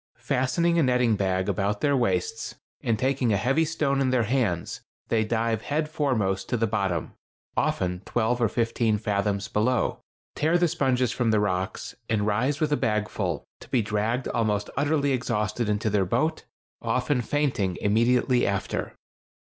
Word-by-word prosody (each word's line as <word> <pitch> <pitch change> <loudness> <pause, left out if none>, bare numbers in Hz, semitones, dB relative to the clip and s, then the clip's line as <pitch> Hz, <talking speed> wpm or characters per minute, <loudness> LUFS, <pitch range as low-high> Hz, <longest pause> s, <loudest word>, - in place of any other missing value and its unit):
Fastening 135 +8 +1
a - - +5
netting 125 -4 +3
bag 95 -1 0
about 100 +1 -1
their 145 -1 +3
waists, 115 -2 -1 0.3
and 115 -2 0
taking 130 0 +1
a 100 - +3
heavy 135 +11 +2
stone 150 -4 0
in 130 - +2
their 125 -2 +2
hands, 110 -8 -1 0.3
they 110 -1 +2
dive 115 0 0
head 150 +4 -1
foremost 110 - -1
to 120 - +1
the 115 - +2
bottom,—often 90 -2 -2
twelve 120 +1 0
or 115 - +3
fifteen 115 -1 +1
fathoms 100 -1 -1
below,—tear 125 +8 -1
the 175 0 +3
sponges 130 -7 +1
from 120 -1 0
the 110 -1 +3
rocks, 95 -1 -2 0.2
and 105 -2 +1
rise 125 +8 +1
with 155 -2 0
a 145 - +3
bagful, 105 -1 -1 0.2
to - - -14
be 120 -4 +2
dragged 110 +4 -1
almost 105 -3 0
utterly 145 0 +1
exhausted 115 -3 -1
into 105 +2 0
their 100 -1 +2
boat, 130 - 0 0.4
often 125 +1 0
fainting 120 -10 0
immediately 120 +4 +2
after. 100 -1 -2
115 Hz, 155 wpm, -26 LUFS, 105-130 Hz, 0.4 s, a